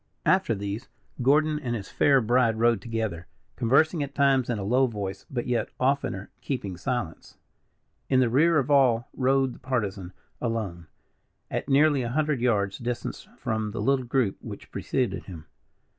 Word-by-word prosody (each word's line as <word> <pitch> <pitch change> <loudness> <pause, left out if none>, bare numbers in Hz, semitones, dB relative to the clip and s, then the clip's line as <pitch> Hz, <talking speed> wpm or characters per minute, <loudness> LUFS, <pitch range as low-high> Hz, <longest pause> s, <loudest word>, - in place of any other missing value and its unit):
After 185 -11 +3
these, 100 +2 -5 0.3
Gordon 150 +4 +3
and 120 -5 -3
his 100 -4 -6
fair 140 -2 +4
bride 115 0 +2
rode 115 -2 +3
together, 110 -7 -3 0.3
conversing 150 +7 +3
at 140 0 -4
times 135 -3 +3
in 120 - 0
a 100 - -4
low 125 +6 +3
voice, 100 -4 -5
but 120 -3 -3
yet 120 -4 0
oftener 130 -7 0
keeping 105 -9 -3
silence. 90 -2 -4 0.7
In 130 - +4
the 130 - +4
rear 155 +8 +4
of 140 0 0
all 125 -4 +4
rode 135 -1 +2
the - - -14
Partisan, 105 -8 -3 0.3
alone, 105 -8 -3 0.6
at - - -3
nearly 145 0 +4
a 120 - -2
hundred 150 -1 0
yards 100 -5 +1
distance 120 0 -4
from 110 -1 -2
the - - -4
little 135 -2 +1
group 120 -5 0
which - - -9
preceded 105 -8 -2
him. 85 -5 -10
120 Hz, 160 wpm, -26 LUFS, 105-135 Hz, 0.7 s, fair